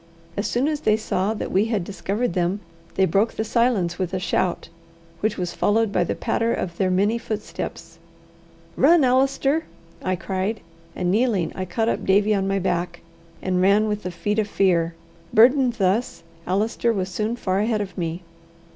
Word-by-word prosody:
As 200 Hz, -, -1 dB
soon 250 Hz, +4 st, +1 dB
as 305 Hz, -1 st, -1 dB
they 215 Hz, -7 st, +2 dB
saw 215 Hz, -1 st, -1 dB
that -, -, -4 dB
we 195 Hz, +3 st, +3 dB
had 220 Hz, -5 st, -1 dB
discovered 200 Hz, +4 st, -2 dB
them, 180 Hz, +3 st, 0 dB, 0.4 s
they 190 Hz, -, +4 dB
broke 195 Hz, +6 st, +1 dB
the 220 Hz, -, -2 dB
silence 220 Hz, -6 st, +1 dB
with 185 Hz, 0 st, -2 dB
a -, -, -1 dB
shout, 180 Hz, -1 st, -1 dB, 0.5 s
which 215 Hz, +3 st, -1 dB
was 180 Hz, -2 st, -3 dB
followed 220 Hz, 0 st, +1 dB
by 180 Hz, -, +2 dB
the -, -, -2 dB
patter 230 Hz, 0 st, 0 dB
of 170 Hz, -2 st, -4 dB
their 190 Hz, -2 st, +1 dB
many 205 Hz, +5 st, +2 dB
footsteps. 215 Hz, -2 st, -6 dB, 0.8 s
"Run, 335 Hz, -2 st, +5 dB
Allister!" 270 Hz, +4 st, +2 dB, 0.4 s
I 185 Hz, 0 st, 0 dB
cried; 195 Hz, +4 st, -3 dB, 0.3 s
and 180 Hz, -1 st, 0 dB
kneeling, 210 Hz, -5 st, +1 dB
I 185 Hz, -, -4 dB
caught 220 Hz, +5 st, -1 dB
up -, -, -1 dB
Davie 205 Hz, +2 st, +3 dB
on 195 Hz, -1 st, 0 dB
my 195 Hz, 0 st, +1 dB
back, 175 Hz, -2 st, -2 dB, 0.4 s
and 185 Hz, -1 st, +1 dB
ran 200 Hz, +3 st, +4 dB
with 210 Hz, 0 st, -2 dB
the 180 Hz, -, -4 dB
feet 205 Hz, +5 st, -2 dB
of 210 Hz, -, 0 dB
fear. 170 Hz, -5 st, +1 dB, 0.4 s
Burdened 250 Hz, +2 st, +5 dB
thus, 205 Hz, +1 st, 0 dB, 0.2 s
Allister 215 Hz, +5 st, +1 dB
was 190 Hz, -4 st, -2 dB
soon 215 Hz, +5 st, -2 dB
far 190 Hz, -5 st, -1 dB
ahead 215 Hz, +1 st, +1 dB
of 195 Hz, -4 st, -5 dB
me. 170 Hz, 0 st, -3 dB
200 Hz, 180 wpm, -23 LUFS, 185-225 Hz, 0.8 s, Run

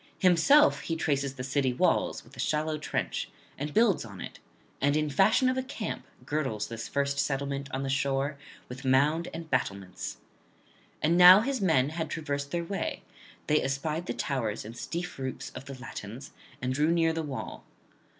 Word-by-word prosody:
Himself 200 Hz, -, +5 dB
he 165 Hz, -, -3 dB
traces 140 Hz, -4 st, -1 dB
the 125 Hz, -, -5 dB
city 135 Hz, -1 st, +1 dB
walls -, -, +1 dB
with -, -, -17 dB
a -, -, -14 dB
shallow 155 Hz, 0 st, 0 dB
trench, -, -, -2 dB, 0.3 s
and 145 Hz, +2 st, -4 dB
builds 215 Hz, 0 st, +3 dB
on 100 Hz, -5 st, -10 dB
it; -, -, -8 dB, 0.4 s
and 145 Hz, +2 st, +3 dB
in 150 Hz, -1 st, 0 dB
fashion 205 Hz, -, +4 dB
of 255 Hz, 0 st, +1 dB
a -, -, +1 dB
camp 255 Hz, -5 st, -5 dB, 0.2 s
girdles 135 Hz, -8 st, -1 dB
this 115 Hz, -1 st, -5 dB
first 140 Hz, 0 st, -1 dB
settlement 140 Hz, 0 st, -1 dB
on 135 Hz, +1 st, -2 dB
the -, -, -2 dB
shore 140 Hz, +1 st, 0 dB, 0.3 s
with 125 Hz, +1 st, -9 dB
mound 145 Hz, +6 st, +3 dB
and 165 Hz, -1 st, -7 dB
battlements. 100 Hz, -7 st, -2 dB, 0.9 s
And 165 Hz, +3 st, +3 dB
now 180 Hz, +3 st, +10 dB
his 260 Hz, 0 st, -1 dB
men 155 Hz, -8 st, +3 dB
had 160 Hz, 0 st, -3 dB
traversed 140 Hz, -3 st, -3 dB
their 170 Hz, +3 st, -1 dB
way; 195 Hz, +3 st, -3 dB, 0.4 s
they 150 Hz, 0 st, +3 dB
espied 150 Hz, +5 st, -2 dB
the -, -, -1 dB
towers 115 Hz, -8 st, -2 dB
and 115 Hz, +2 st, -8 dB
steep 175 Hz, +4 st, -5 dB
roofs 130 Hz, -1 st, -5 dB
of 135 Hz, -, -9 dB
the 135 Hz, -1 st, -8 dB
Latins, 120 Hz, 0 st, -8 dB, 0.3 s
and 130 Hz, 0 st, 0 dB
drew 150 Hz, +4 st, +2 dB
near 165 Hz, -1 st, +3 dB
the 165 Hz, -, -2 dB
wall. 145 Hz, -4 st, -6 dB
145 Hz, 180 wpm, -29 LUFS, 135-165 Hz, 0.9 s, now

